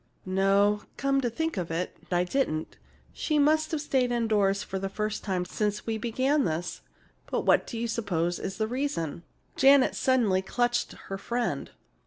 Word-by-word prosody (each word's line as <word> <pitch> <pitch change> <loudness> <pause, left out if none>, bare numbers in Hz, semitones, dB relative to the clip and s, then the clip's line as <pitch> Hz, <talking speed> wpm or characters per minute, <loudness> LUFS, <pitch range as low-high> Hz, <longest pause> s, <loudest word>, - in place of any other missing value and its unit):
"No, 195 +2 +3 0.2
come 275 0 +1
to 245 - 0
think 320 +3 -2
of 175 -3 -2
it, 165 +2 -3 0.2
I 175 0 +3
didn't. 180 - -2 0.3
She 305 - 0
must 310 +2 +3
have 315 -2 -2
stayed 260 -4 +1
indoors 210 -4 +2
for 190 - -4
the 195 0 -3
first 210 +1 -3
time 185 -3 -1
since 210 +2 -2
we 225 -1 -2
began 260 +6 +1
this. 165 +2 -3 0.5
But - - 0
what - - +3
do 235 - -5
you 235 +1 -1
suppose 175 -7 -1
is 190 - -5
the 220 - +1
reason?" 215 - -2 0.3
Janet 270 0 +6
suddenly 230 -8 +2
clutched 240 +5 0
her 195 0 -7
friend. 240 +4 -2
215 Hz, 170 wpm, -28 LUFS, 190-260 Hz, 0.5 s, Janet